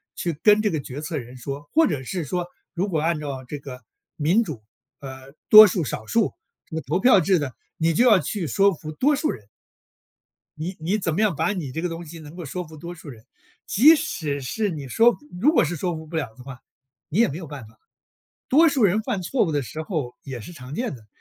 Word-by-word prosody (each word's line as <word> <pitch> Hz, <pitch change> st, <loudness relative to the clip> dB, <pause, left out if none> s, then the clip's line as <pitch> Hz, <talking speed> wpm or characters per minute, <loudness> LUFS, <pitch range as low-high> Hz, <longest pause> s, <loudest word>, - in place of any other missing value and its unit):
去 175 Hz, -, -2 dB
跟 210 Hz, 0 st, +5 dB
这 210 Hz, -, +1 dB
个 155 Hz, -, -1 dB
决 140 Hz, +2 st, -7 dB
策 155 Hz, 0 st, -4 dB
人 125 Hz, 0 st, -8 dB
说， 140 Hz, +3 st, -7 dB
或 325 Hz, +1 st, +5 dB
者 145 Hz, -7 st, -2 dB
是 175 Hz, +5 st, -3 dB
说， 175 Hz, +4 st, -3 dB, 0.3 s
如 190 Hz, +3 st, -1 dB
果 160 Hz, -4 st, 0 dB
按 165 Hz, -1 st, 0 dB
照 140 Hz, -3 st, -5 dB
这 145 Hz, +2 st, -6 dB
个， 130 Hz, -2 st, -10 dB, 0.3 s
民 170 Hz, +9 st, +2 dB
主， 135 Hz, -, -7 dB, 0.4 s
呃， 135 Hz, 0 st, -10 dB, 0.2 s
多 215 Hz, 0 st, +11 dB
数 180 Hz, -2 st, -1 dB
少 110 Hz, -5 st, -5 dB
数 225 Hz, -3 st, +1 dB, 0.3 s
这 160 Hz, -, -9 dB
个 160 Hz, -, -2 dB
投 170 Hz, +7 st, -1 dB
票 210 Hz, -3 st, +6 dB
制 185 Hz, 0 st, +2 dB
的， 135 Hz, -4 st, -4 dB, 0.2 s
你 165 Hz, +1 st, +1 dB
就 245 Hz, +9 st, +4 dB
要 205 Hz, -4 st, +6 dB
去 180 Hz, -5 st, -3 dB
说 200 Hz, +3 st, +3 dB
服 155 Hz, -1 st, -8 dB
多 280 Hz, -, +2 dB
数 305 Hz, +2 st, -1 dB
人。 105 Hz, -4 st, -10 dB, 1.1 s
你 175 Hz, +5 st, -4 dB
你 180 Hz, +7 st, 0 dB
怎 165 Hz, -6 st, -2 dB
么 205 Hz, -, 0 dB
样 205 Hz, -7 st, +2 dB
把 165 Hz, +7 st, 0 dB
你 155 Hz, -9 st, -5 dB
这 160 Hz, -, -4 dB
个 180 Hz, -, -1 dB
东 165 Hz, +1 st, -7 dB
西 165 Hz, +2 st, -10 dB
能 155 Hz, +2 st, -12 dB
够 175 Hz, -3 st, -7 dB
说 180 Hz, +5 st, -5 dB
服 155 Hz, -1 st, -12 dB
多 170 Hz, +3 st, -7 dB
数 165 Hz, -3 st, -12 dB
人。 115 Hz, -4 st, -12 dB, 0.4 s
即 300 Hz, +10 st, +6 dB
使 145 Hz, -, -3 dB
是 205 Hz, -, -2 dB
你 145 Hz, -5 st, -6 dB
说 230 Hz, -, +4 dB, 0.2 s
如 300 Hz, -, +4 dB
果 -, -, +4 dB
是 165 Hz, +3 st, -2 dB
说 175 Hz, +2 st, -2 dB
服 160 Hz, 0 st, -8 dB
不 165 Hz, -, -8 dB
了 140 Hz, -8 st, -2 dB
的 125 Hz, -, -13 dB
话， 130 Hz, -1 st, -10 dB, 0.5 s
你 185 Hz, -, -1 dB
也 235 Hz, -, +5 dB
没 145 Hz, -, -5 dB
有 170 Hz, -4 st, -8 dB
办 135 Hz, -6 st, -9 dB
法。 110 Hz, 0 st, -22 dB, 0.7 s
多 320 Hz, +5 st, +6 dB
数 270 Hz, -5 st, 0 dB
人 205 Hz, +2 st, +4 dB
犯 210 Hz, -6 st, -2 dB
错 240 Hz, +6 st, +1 dB
误 160 Hz, -, -2 dB
的 145 Hz, -1 st, 0 dB
时 155 Hz, +7 st, -6 dB
候， 150 Hz, -8 st, -4 dB
也 130 Hz, -4 st, -7 dB
是 175 Hz, -, -10 dB
常 130 Hz, -2 st, -9 dB
见 240 Hz, -, -2 dB
的。 110 Hz, -3 st, -15 dB
160 Hz, 260 characters per minute, -23 LUFS, 140-195 Hz, 1.1 s, 多